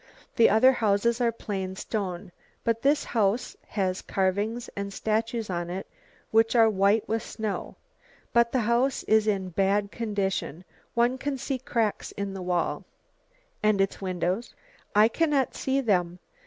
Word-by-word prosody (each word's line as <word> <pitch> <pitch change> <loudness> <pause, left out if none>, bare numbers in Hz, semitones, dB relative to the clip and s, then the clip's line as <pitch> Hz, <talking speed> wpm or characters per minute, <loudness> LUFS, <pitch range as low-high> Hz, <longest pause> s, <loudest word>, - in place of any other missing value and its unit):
The 230 - +6
other 220 +5 +6
houses 230 0 +1
are 235 -1 +3
plain 195 -4 -4
stone, 190 -4 -4 0.3
but 230 0 0
this 285 +2 +3
house 220 +1 0
has 190 -2 -1
carvings 205 +5 -1
and 200 0 -4
statues 220 +2 -1
on 175 -2 -3
it, 185 +2 -4 0.5
which 225 +2 +3
are 225 -1 +7
white 200 +2 +2
with 225 0 0
snow. 215 -2 -4 0.6
But 235 0 +4
the 255 - +1
house 240 +4 +1
is 220 0 +3
in 195 -3 0
bad 200 +3 +1
condition, 195 -7 -2 0.3
one 240 +2 +2
can 285 0 -2
see 260 +1 -3
cracks 230 -5 -1
in 200 -1 -4
the 190 - -6
wall." 180 -1 -1 0.8
"And 215 -2 +3
its 195 +1 0
windows?" 185 +3 -2 0.4
"I 210 +1 +7
cannot 290 0 +1
see 270 +1 0
them. 180 -7 +1
215 Hz, 150 wpm, -27 LUFS, 195-235 Hz, 0.8 s, are